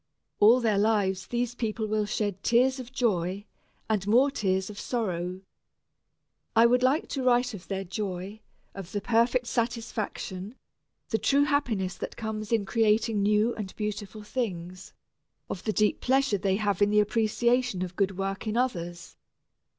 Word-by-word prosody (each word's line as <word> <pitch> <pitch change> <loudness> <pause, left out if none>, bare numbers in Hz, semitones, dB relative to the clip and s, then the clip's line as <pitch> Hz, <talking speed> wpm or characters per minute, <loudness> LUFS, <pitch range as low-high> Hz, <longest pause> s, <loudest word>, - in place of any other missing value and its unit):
All 225 +5 +7
their 215 -4 +2
lives 200 -3 +1
these 240 0 -1
people 220 -2 -2
will 215 -1 0
shed 205 -2 -2
tears 255 +3 +3
of 255 -1 -8
joy, 200 -6 0 0.4
and 210 -3 -1
more 255 +6 +4
tears 190 -7 0
of 205 - -9
sorrow. 185 -6 -2 1.1
I 225 +1 +7
would 250 +1 +4
like 265 +5 +2
to 275 - -2
write 245 -1 +2
of 190 -3 -9
their 195 -1 -3
joy, 195 +1 -5 0.3
of 195 -2 -9
the 205 - 0
perfect 235 +4 +2
satisfaction, 225 -4 -3 0.5
the 220 - 0
true 280 +1 +3
happiness 240 -11 0
that - - -6
comes 215 -1 -4
in 220 -3 +2
creating 220 0 +2
new 210 +3 +3
and 200 -3 -6
beautiful 210 0 -5
things, 190 -4 -4 0.6
of 180 - -5
the 215 - +1
deep 210 0 +1
pleasure 265 -5 +2
they 190 0 +1
have 205 -2 -1
in 205 - +5
the 210 0 +4
appreciation 230 0 +1
of 180 0 -6
good 195 -1 0
work 195 +2 -3
in 215 +2 -1
others. 175 -9 -2
215 Hz, 160 wpm, -27 LUFS, 195-240 Hz, 1.1 s, All